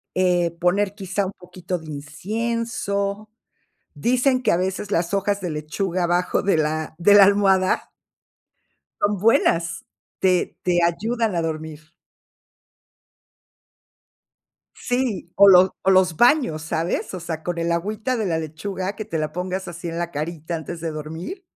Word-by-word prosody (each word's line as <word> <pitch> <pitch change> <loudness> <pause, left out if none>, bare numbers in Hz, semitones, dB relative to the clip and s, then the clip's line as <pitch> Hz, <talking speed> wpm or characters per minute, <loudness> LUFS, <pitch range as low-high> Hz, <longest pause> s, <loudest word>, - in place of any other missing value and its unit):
eh, 180 -2 +2
poner 195 +3 +1
quizá, 195 0 -2
un 195 - -7
poquito 180 0 -5
de 160 - -12
incienso. 200 +5 -3 0.6
Dicen 255 +2 +1
que, - - +3
a - - +3
veces, 190 +2 -2
las 170 0 0
hojas 200 +1 0
de 180 -4 -4
lechuga 170 +5 -2
abajo 175 +1 +1
de 195 -4 +2
la 155 0 -1
de 190 +4 +5
la 205 -1 +9
almohada 195 -2 +2 1.1
son 205 0 +1
buenas, 170 -5 +2 0.3
te 185 -2 +1
te 175 -1 +2
ayudan 220 +5 0
a 170 - +1
dormir. 155 0 -6 2.8
Sí, 245 -8 -2
o 200 - +7
lo 185 -1 +6
o 190 - +3
los 185 -4 +4
baños, 240 - +3
¿sabes? 160 +4 -2
O 185 - -4
sea, 160 -1 -5
con 175 -1 -3
el 170 0 0
agüita 210 +8 -1
de 220 - -1
la 165 -4 0
lechuga, 185 +5 -4
que 215 - -5
te 200 -6 -3
la 155 -1 -2
pongas 185 +2 -4
así 170 0 -7
en 165 - -4
la 170 0 -3
carita 160 +2 -4
antes 165 +1 -6
de 165 -1 -3
dormir. 160 - -7
180 Hz, 150 wpm, -22 LUFS, 165-200 Hz, 2.8 s, la